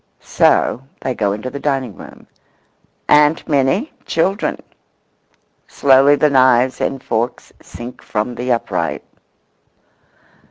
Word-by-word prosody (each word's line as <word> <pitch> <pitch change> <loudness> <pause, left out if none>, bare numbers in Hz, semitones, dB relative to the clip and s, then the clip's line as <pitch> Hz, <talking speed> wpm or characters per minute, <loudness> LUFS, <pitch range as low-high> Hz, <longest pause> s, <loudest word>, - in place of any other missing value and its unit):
So 125 - +2 0.2
they 130 - -2
go 105 -4 -1
into 110 +5 -5
the 140 - -6
dining 135 -7 -2
room. - - -13 0.8
"Aunt 150 +1 +3
Minnie, 145 - 0
children."Slowly 145 - -1
the 150 0 +2
knives 130 -1 +3
and 135 -1 -2
forks 115 +2 -3
sink 120 +1 -10
from 105 +4 -3
the 125 +1 -3
upright. 120 - -2
130 Hz, 105 wpm, -17 LUFS, 120-145 Hz, 0.8 s, Aunt